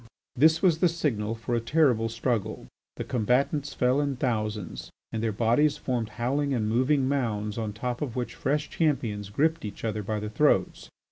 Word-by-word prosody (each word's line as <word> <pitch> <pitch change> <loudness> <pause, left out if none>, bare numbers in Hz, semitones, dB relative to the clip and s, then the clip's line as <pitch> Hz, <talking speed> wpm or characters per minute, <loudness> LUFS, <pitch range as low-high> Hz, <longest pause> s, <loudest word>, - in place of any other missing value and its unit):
This 160 +6 +4
was 170 -4 +4
the 180 - +4
signal 115 -10 -1
for 115 +1 -4
a 120 - +2
terrible 115 -3 +2
struggle. 115 -2 -2 0.3
The - - -4
combatants 135 +5 0
fell 130 +3 +2
in 140 -2 -1
thousands, 110 - -3 0.2
and 110 - -3
their 115 -1 0
bodies 120 +8 +2
formed 120 -6 -2
howling 140 +3 0
and 110 -3 0
moving 130 +4 +2
mounds 110 -7 -1
on 110 -2 -2
top 120 +4 -4
of 135 -6 -3
which 125 -1 -3
fresh 145 +2 -1
champions 115 - -1
gripped 160 +9 +1
each 105 -2 -7
other 110 -1 -1
by 105 +1 -2
the 105 0 -5
throats. 115 -7 +1
120 Hz, 180 wpm, -27 LUFS, 110-145 Hz, 0.3 s, This